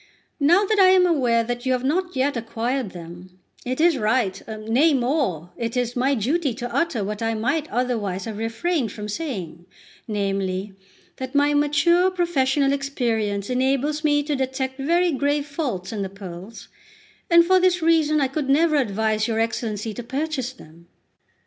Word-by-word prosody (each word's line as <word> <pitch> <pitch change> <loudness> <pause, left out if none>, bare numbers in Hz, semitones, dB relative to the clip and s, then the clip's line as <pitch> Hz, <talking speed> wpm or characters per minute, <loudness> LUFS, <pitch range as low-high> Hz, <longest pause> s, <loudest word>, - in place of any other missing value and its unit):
Now 345 +8 +4
that 425 +1 +1
I 380 - +7
am 370 -1 +5
aware 245 -9 +2 0.2
you 260 +1 0
have 250 0 -1
not 355 +5 -1
yet 265 +2 +1
acquired 235 +1 -2
them, 175 +1 -11 0.3
it 255 +2 -3
is 330 -4 +3
right, 210 -3 0
nay, 225 +8 +2
more, 240 - -1
it 230 +1 -3
is 245 -1 -1
my 265 +3 +2
duty 270 - 0
to 245 0 -5
utter 330 -11 0
what 210 +2 -4
I 225 0 0
might 275 +8 -1
otherwise 220 -7 -2
have 220 -2 -6
refrained 230 - -1
from 210 0 -7
saying, 200 - -5 0.4
namely, 195 -2 -2 0.4
that 260 +1 -6
my 290 +1 +3
mature 295 +5 +3
professional 285 -6 +1
experience 225 -8 -1
enables 275 +4 0
me 290 -1 +2
to 295 0 -1
detect 265 0 -3
very 340 +5 +2
grave 285 0 0
faults 255 - -4
in 210 - -3
the 195 - -3
pearls, 195 +2 -10 0.6
and 340 -1 +6
for 375 +1 +4
this 360 -2 +2
reason 315 -2 +3
I 275 - +2
could 270 +1 -3
never 305 +2 +3
advise 215 -3 0
your 225 -1 -1
Excellency 225 -1 -2
to 245 - -6
purchase 265 +1 -3
them." 170 -8 -17
260 Hz, 165 wpm, -23 LUFS, 215-295 Hz, 0.6 s, I